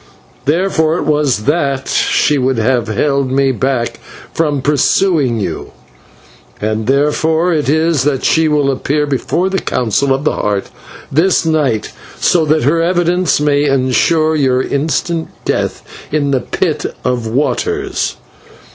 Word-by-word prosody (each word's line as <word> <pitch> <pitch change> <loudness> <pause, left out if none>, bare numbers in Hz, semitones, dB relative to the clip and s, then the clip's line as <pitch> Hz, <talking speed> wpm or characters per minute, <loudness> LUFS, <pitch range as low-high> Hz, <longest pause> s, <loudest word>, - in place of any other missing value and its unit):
Therefore 160 0 +1
it - - -2
was 150 -7 +1
that 140 -2 0
she 145 -1 +1
would 130 -1 0
have 120 +1 +1
held 140 +5 0
me 135 0 +2
back 130 0 -2 0.3
from 145 -4 0
pursuing 145 -3 +2
you, 100 - -5 0.9
and 110 +1 -2
therefore 160 +5 +1
it 150 -4 0
is 160 -1 +2
that 135 -1 0
she 160 0 +3
will 145 -2 +2
appear 145 +3 -1
before 145 +6 -1
the 190 0 -1
Council 125 - 0
of 135 +1 0
the 150 - +1
Heart 100 -1 -2 0.4
this 170 +5 +2
night, 145 -9 0 0.3
so 165 -3 +2
that 155 -1 +1
her 160 +6 +2
evidence 175 -2 +1
may 145 -1 +2
ensure 145 +4 +2
your 130 -3 +1
instant 160 +3 -1 0.2
death - - -2 0.3
in 145 -2 0
the 135 - +2
Pit - - -2 0.2
of 125 -2 -1
Waters. 385 - -1
145 Hz, 140 wpm, -14 LUFS, 130-160 Hz, 0.9 s, she